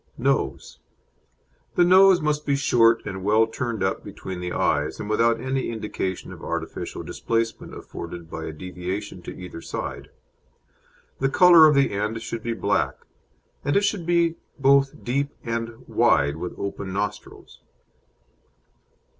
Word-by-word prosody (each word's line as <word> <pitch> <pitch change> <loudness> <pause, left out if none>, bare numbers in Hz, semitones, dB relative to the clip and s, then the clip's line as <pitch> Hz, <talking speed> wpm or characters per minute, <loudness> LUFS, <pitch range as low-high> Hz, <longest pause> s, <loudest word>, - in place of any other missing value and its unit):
NOSE - - -1 1.0
The - - +5
nose 185 0 +6
must 150 0 0
be 140 - +1
short 115 -5 +3
and 95 -1 -5
well 110 +3 +4
turned 115 -2 -3
up 95 - -1
between 95 -2 -7
the 90 0 -4
eyes, - - 0
and - - -5
without 115 +2 +2
any 130 0 -2
indication 105 -4 -4
of - - -12
artificial - - -4
displacement 115 0 -2
afforded 85 0 -8
by 80 0 -6
a - - -4
deviation 90 +3 -6
to - - -8
either 90 -2 -8
side. - - -6 1.1
The 135 - +2
colour 170 0 +8
of 150 - +4
the 140 0 +3
end 105 +3 -2
should 115 0 -5
be 115 +1 -2
black, 80 -12 0 0.7
and 145 - 0
it 200 - +2
should 200 -4 -1
be 170 -1 +2 0.2
both 140 0 +3
deep 140 +3 0
and 115 0 -4
wide 70 +1 +3
with 90 - -6
open 100 -1 -4
nostrils. 100 +1 -5
115 Hz, 145 wpm, -24 LUFS, 95-140 Hz, 1.1 s, colour